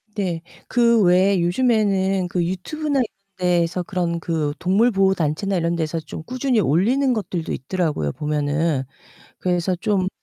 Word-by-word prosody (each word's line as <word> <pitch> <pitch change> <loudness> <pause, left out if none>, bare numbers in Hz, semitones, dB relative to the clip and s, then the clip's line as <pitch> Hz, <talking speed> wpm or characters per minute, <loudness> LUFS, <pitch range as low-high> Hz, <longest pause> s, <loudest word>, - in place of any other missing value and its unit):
네. 180 -5 -2 0.3
그 235 -2 +4
외에 185 +1 +4
요즘에는 195 -2 +1
그 175 -1 0
유튜브나 280 - -2
이런 250 - +2 0.3
데서 180 0 +1
그런 175 -2 -2
그 160 -3 -1
동물 205 +7 +3
보호 195 -1 +3
단체나 170 +4 -1
이런 170 -1 0
데서 165 0 -2
좀 155 - -8
꾸준히 255 - 0
올리는 235 - +2
것들도 180 -6 -3
있더라고요 150 - -1
보면은. 150 0 0 0.6
그래서 180 0 0
좀 195 -1 0
180 Hz, 310 characters per minute, -22 LUFS, 165-205 Hz, 0.6 s, 그